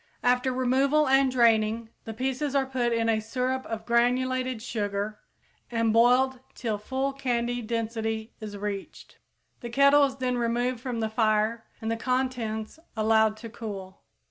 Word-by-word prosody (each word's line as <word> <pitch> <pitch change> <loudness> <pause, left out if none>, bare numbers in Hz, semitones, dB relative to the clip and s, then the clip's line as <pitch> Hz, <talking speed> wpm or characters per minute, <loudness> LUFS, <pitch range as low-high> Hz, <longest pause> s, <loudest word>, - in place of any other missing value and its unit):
After 250 +1 +2
removal 265 +4 +2
and 270 0 +4
draining 225 -2 +3 0.2
the 225 - -5
pieces 265 +3 -2
are 275 -1 +3
put 255 -2 -1
in 230 -1 +1
a 225 -1 +2
syrup 255 +4 -2
of 220 -1 -5
granulated 255 +1 +1
sugar 210 -2 -3 0.5
and 230 -2 +1
boiled 250 +3 +4 0.2
till 220 -4 -2
full 265 +5 -2
candy 245 -2 -1
density 225 0 -3
is 210 -2 -7
reached. 200 -1 -6 0.4
The 240 - -6
kettle 280 +3 +5
is 270 -1 -3
then 250 -2 -1
removed 240 +1 0
from 245 -2 -4
the 220 - +1
fire 220 0 +1
and 220 0 -3
the 230 - -1
contents 245 -1 -2 0.2
allowed 220 0 +3
to - - -6
cool. 200 -5 -8
235 Hz, 150 wpm, -27 LUFS, 220-255 Hz, 0.5 s, kettle